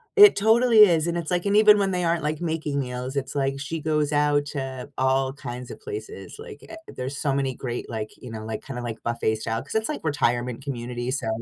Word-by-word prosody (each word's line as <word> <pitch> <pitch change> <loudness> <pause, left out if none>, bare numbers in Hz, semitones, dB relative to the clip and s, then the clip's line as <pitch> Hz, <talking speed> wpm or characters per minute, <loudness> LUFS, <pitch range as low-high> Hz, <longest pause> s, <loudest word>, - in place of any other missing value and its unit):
It 415 -1 +9
totally 225 +2 +4
is, 170 -4 +4
and 170 0 -1
it's 170 0 -4
like 175 +2 0
and 200 +1 +2
even 210 -1 +7
when 195 -1 +1
they 180 -1 -1
aren't, 165 -2 +1
like, 150 +2 -2
making 155 -4 -2
meals, 125 +1 -4
it's, 140 +1 -3
like, 135 0 0
she 160 +3 -4
goes 150 -1 0
out 145 0 +2
to 135 -2 -5
all 130 0 +2
kinds 125 -2 -7
of - - -9
places 425 0 -8
like, 445 -2 -10
eh, - - -9 0.2
there's 130 +3 -4
so 140 -3 0
many 135 -1 0
great, 120 -2 -5
like, 110 -1 -4
you 125 - -10
know, 110 -1 -6
like, 110 -1 -5
kinda, 125 -3 -5
like, 115 -2 -6
buffet 115 -2 0
style 115 +1 -3
'cause - - -9
it's, 220 0 +1
like, 300 - -4
retirement 125 -4 0
community, 120 -2 -4
so, 135 -4 -2
140 Hz, 230 wpm, -25 LUFS, 125-170 Hz, 0.2 s, It